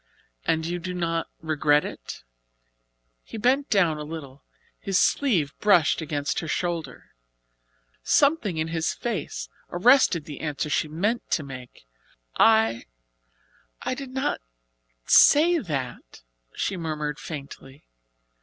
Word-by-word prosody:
"And 160 Hz, 0 st, +1 dB
you 175 Hz, +1 st, -3 dB
do 180 Hz, +1 st, -5 dB
not 165 Hz, -2 st, -1 dB
regret 150 Hz, -2 st, +2 dB
it?" -, -, -8 dB, 1.0 s
He -, -, -9 dB
bent 260 Hz, +6 st, +1 dB
down 170 Hz, -7 st, +2 dB
a -, -, -4 dB
little. 145 Hz, -3 st, -9 dB, 0.4 s
His 195 Hz, 0 st, 0 dB
sleeve 180 Hz, -, +2 dB
brushed 180 Hz, -6 st, +4 dB
against 145 Hz, -2 st, -2 dB
her 160 Hz, -, -6 dB
shoulder. 165 Hz, -5 st, -3 dB, 0.9 s
Something 275 Hz, -, +2 dB
in 160 Hz, +1 st, -1 dB
his 165 Hz, 0 st, -1 dB
face 170 Hz, -, -4 dB, 0.2 s
arrested 180 Hz, -, +4 dB
the 150 Hz, -, -8 dB
answer 150 Hz, -1 st, -3 dB
she 155 Hz, -, +1 dB
meant 200 Hz, +10 st, -2 dB
to 155 Hz, -, 0 dB
make. 125 Hz, -, -11 dB, 0.5 s
"I 220 Hz, -, +4 dB, 1.0 s
I -, -, -1 dB
did 270 Hz, 0 st, -7 dB
not 265 Hz, +1 st, -2 dB, 0.6 s
say 335 Hz, +4 st, +6 dB
that," 130 Hz, -, -6 dB, 0.3 s
she 190 Hz, -, -2 dB
murmured 150 Hz, -3 st, -3 dB
faintly. 140 Hz, -2 st, -9 dB
165 Hz, 120 wpm, -25 LUFS, 150-205 Hz, 1.0 s, say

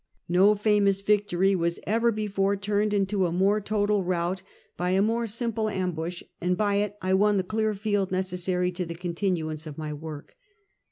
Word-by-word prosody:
No 190 Hz, +4 st, +5 dB
famous 205 Hz, -2 st, +2 dB
victory 195 Hz, -2 st, +2 dB
was 170 Hz, -1 st, -1 dB
ever 230 Hz, +2 st, +2 dB
before 200 Hz, -2 st, 0 dB
turned 205 Hz, +1 st, 0 dB
into 195 Hz, -2 st, +1 dB
a -, -, -3 dB
more 195 Hz, +4 st, +2 dB
total 205 Hz, -1 st, +1 dB
rout 180 Hz, +1 st, -1 dB, 0.3 s
by 180 Hz, 0 st, -1 dB
a 190 Hz, +1 st, +3 dB
more 230 Hz, +2 st, 0 dB
simple 225 Hz, 0 st, -1 dB
ambush, 180 Hz, -3 st, -3 dB, 0.2 s
and 180 Hz, +1 st, +1 dB
by 205 Hz, -1 st, +1 dB
it 205 Hz, 0 st, -1 dB
I 185 Hz, 0 st, +1 dB
won 205 Hz, +2 st, +4 dB
the 190 Hz, -, +1 dB
clear 215 Hz, +2 st, -1 dB
field 205 Hz, -2 st, -1 dB
necessary 180 Hz, -1 st, -1 dB
to 180 Hz, 0 st, -4 dB
the 170 Hz, -, -5 dB
continuance 170 Hz, -3 st, -2 dB
of 150 Hz, -, -8 dB
ray 155 Hz, -1 st, -4 dB
work. 150 Hz, -1 st, -8 dB
195 Hz, 175 wpm, -26 LUFS, 180-210 Hz, 0.3 s, No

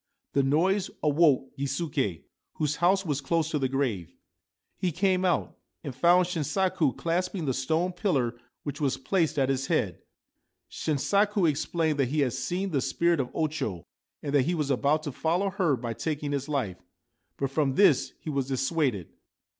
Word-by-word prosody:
The 140 Hz, -, +4 dB
noise 180 Hz, +8 st, +2 dB
awoke 145 Hz, -3 st, +3 dB
Gisuke, 135 Hz, -, -2 dB, 0.3 s
whose 150 Hz, -1 st, -1 dB
house 190 Hz, +3 st, +3 dB
was 145 Hz, -3 st, -1 dB
close 160 Hz, +2 st, 0 dB
to 150 Hz, -, 0 dB
the 130 Hz, -1 st, 0 dB
grave. 115 Hz, -, -2 dB, 0.6 s
He 180 Hz, -, 0 dB
came 185 Hz, +2 st, +1 dB
out, 180 Hz, -2 st, 0 dB, 0.3 s
and 140 Hz, -5 st, -5 dB
found 175 Hz, +7 st, +4 dB
Shinsaku 175 Hz, -3 st, 0 dB
clasping 175 Hz, +1 st, -1 dB
the 135 Hz, -, 0 dB
stone 160 Hz, +8 st, 0 dB
pillar 150 Hz, -, 0 dB, 0.3 s
which 145 Hz, +1 st, -5 dB
was 135 Hz, -3 st, +1 dB
placed 165 Hz, +2 st, 0 dB
at 135 Hz, -1 st, +2 dB
its 135 Hz, 0 st, -1 dB
head. -, -, 0 dB, 0.7 s
Shinsaku 200 Hz, +6 st, +1 dB
explained 155 Hz, 0 st, 0 dB
that 135 Hz, -, +3 dB
he 150 Hz, +2 st, +1 dB
had 130 Hz, -4 st, +1 dB
seen 190 Hz, +2 st, -2 dB
the 140 Hz, -4 st, +1 dB
spirit 170 Hz, +3 st, +1 dB
of 125 Hz, -2 st, -1 dB
O 160 Hz, -, +2 dB
Cho, 120 Hz, -, -4 dB, 0.4 s
and 145 Hz, -, -3 dB
that 140 Hz, -3 st, +4 dB
he 175 Hz, -, 0 dB
was 150 Hz, -3 st, -1 dB
about 145 Hz, +4 st, +2 dB
to 145 Hz, -, -4 dB
follow 175 Hz, +8 st, 0 dB
her 185 Hz, -7 st, +1 dB
by 115 Hz, -1 st, -4 dB
taking 150 Hz, +3 st, -3 dB
his 140 Hz, 0 st, -2 dB
life; 125 Hz, -11 st, -1 dB, 0.6 s
but 135 Hz, -1 st, -2 dB
from 135 Hz, -2 st, +1 dB
this 195 Hz, -9 st, +4 dB
he 155 Hz, -, -5 dB
was 135 Hz, -2 st, -1 dB
dissuaded. 135 Hz, -, 0 dB
150 Hz, 170 wpm, -27 LUFS, 135-175 Hz, 0.7 s, The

